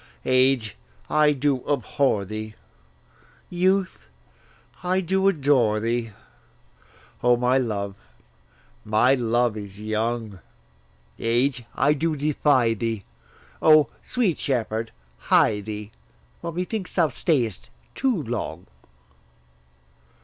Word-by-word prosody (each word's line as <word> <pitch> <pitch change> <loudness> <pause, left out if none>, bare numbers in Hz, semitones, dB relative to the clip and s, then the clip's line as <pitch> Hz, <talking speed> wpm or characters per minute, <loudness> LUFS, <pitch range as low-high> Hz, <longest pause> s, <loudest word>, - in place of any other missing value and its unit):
Age, 130 -4 +2 0.3
I 150 -1 +4
do 140 -2 0
abhor 130 -5 +1
thee; 110 +2 -6 1.0
youth, 185 - 0 0.7
I 185 +1 +1
do 190 +2 +1
adore 135 - +3
thee; 115 +1 -1 1.1
O, 120 0 +4
my 125 +2 +2
love, 100 -5 -2 0.9
my 110 +5 +3
love 120 -2 +1
is 100 -2 -8
young! 110 -1 -2 0.8
Age, 120 +2 0
I 145 +2 +3
do 155 +2 -1
defy 140 -5 +2
thee: 115 -2 -3 0.6
O, 155 -5 +6
sweet 225 -10 0
shepherd, 115 -5 -2 0.3
hie 105 -2 +3
thee, 105 0 -7 0.5
For 170 - -4
methinks 180 +3 -4
thou 165 -4 +3
stay'st 125 - -1 0.2
too 240 - 0
long. 110 -8 -4
125 Hz, 100 wpm, -24 LUFS, 110-150 Hz, 1.1 s, O